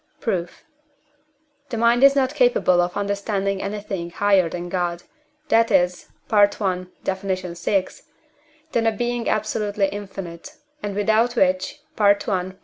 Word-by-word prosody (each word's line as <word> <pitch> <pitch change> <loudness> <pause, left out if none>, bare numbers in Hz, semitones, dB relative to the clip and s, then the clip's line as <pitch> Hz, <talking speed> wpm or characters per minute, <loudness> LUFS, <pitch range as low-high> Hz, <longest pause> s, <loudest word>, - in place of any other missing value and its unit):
Proof. 180 -9 -3 1.1
The 235 - -3
mind 235 +2 +3
is 275 0 +7
not 265 0 +1
capable 245 -10 +3
of 175 +2 -2
understanding 200 -1 -1
anything 200 -4 -4
higher 195 -1 +2
than 175 +1 -5
God, 175 -1 -2 0.5
that 230 0 +4
is 180 0 +1 0.2
(I. 205 -2 +6 0.6
Def. 190 0 -2
vi.), 185 0 -1 0.9
than 230 -3 +1
a - - +4
Being 240 +2 -2
absolutely 210 -2 0
infinite, 190 -4 -8 0.3
and 205 -1 -4
without 220 +4 +2
which 185 -3 +1 0.2
(I. 200 -3 +2
200 Hz, 125 wpm, -22 LUFS, 185-220 Hz, 1.1 s, is